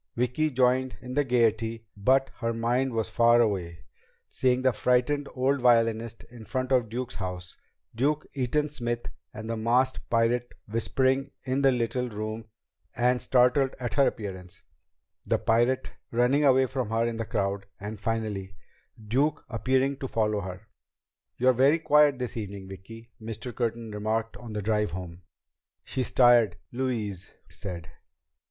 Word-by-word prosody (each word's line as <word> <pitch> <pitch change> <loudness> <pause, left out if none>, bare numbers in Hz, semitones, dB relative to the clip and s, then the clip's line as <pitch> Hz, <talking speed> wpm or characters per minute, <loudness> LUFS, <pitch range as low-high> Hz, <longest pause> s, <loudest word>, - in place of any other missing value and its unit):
Vicki 125 +6 +1
joined 130 -4 +1
in 125 0 -8
the 145 +2 +2
gaiety, 115 -3 +1
but 130 +6 +2
her 115 -1 -1
mind 120 +3 0
was 115 -2 -1
far 120 0 +4
away 90 -7 -1 0.4
seeing 130 0 +1
the 130 -1 +3
frightened 125 +5 +1
old 135 +1 +1
violinist 115 -2 +2
in 120 -2 -11
front 130 +2 -3
of 125 -4 +3
Duke's 125 +2 -4
house; 90 -2 -6 0.4
Duke, 145 +6 0
Eaton 145 +3 0
Smith, 120 -5 -3 0.2
and 110 +1 -8
the 115 - -2
masked 120 +4 +2
pirate 120 +1 +1
whispering 130 +5 +1 0.2
in 130 +1 0
the 135 -1 +5
little 125 0 -1
room 110 +1 -5 0.5
and 125 +1 +2
startled 130 +2 +3
at 120 -2 -3
her 140 -1 +4
appearance; 95 -5 -6 0.6
the - - +2
pirate 120 +3 +1 0.2
running 125 +5 +2
away 130 -1 +5
from 130 -3 -3
her 115 +1 +1
in 115 -1 -2
the 115 - -2
crowd; 100 -2 -2
and 105 +1 -6
finally, 105 -4 -3 0.5
Duke 145 +7 +1
appearing 130 +3 +1
to 135 - -4
follow 105 -3 0
her. 95 +3 -8 0.7
"You're 130 +1 +4
very 135 +6 +4
quiet 150 -3 +4
this 125 -2 -4
evening, 100 -3 -6
Vicki," 115 +5 -11
Mr. 115 +2 -6
Curtin 115 -2 -2
remarked 110 +2 -2
on 120 -3 -9
the 105 -1 -3
drive 105 -2 0
home. 90 -1 -7 0.6
"She's 130 -3 -2
tired," 120 -7 +5 0.2
Louise 110 -7 -3 0.2
said. 85 -4 -6
120 Hz, 150 wpm, -27 LUFS, 110-130 Hz, 0.7 s, the